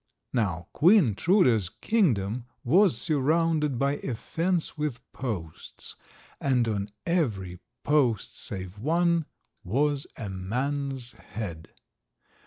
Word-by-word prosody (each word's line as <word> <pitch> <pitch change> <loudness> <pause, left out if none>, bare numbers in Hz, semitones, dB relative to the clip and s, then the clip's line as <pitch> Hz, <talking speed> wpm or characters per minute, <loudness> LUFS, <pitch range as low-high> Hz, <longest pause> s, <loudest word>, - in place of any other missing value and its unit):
Now 95 -9 0
Queen 170 - +5
Truda's 125 - +3
kingdom 120 - 0 0.2
was 180 - +4
surrounded 155 -1 +2
by 140 +3 +1
a 125 - -4
fence 170 +7 -1
with 150 -5 -2
posts, 95 -11 -6 0.4
and 125 -4 +2
on 100 -2 -1 0.2
every 105 - -1 0.2
post, 135 -8 +2
save 95 +1 -6
one, 170 +4 +2 0.4
was 140 +7 0
a 110 - -5
man's 125 +7 -3
head. 85 -11 -8
130 Hz, 100 wpm, -27 LUFS, 105-155 Hz, 0.4 s, Queen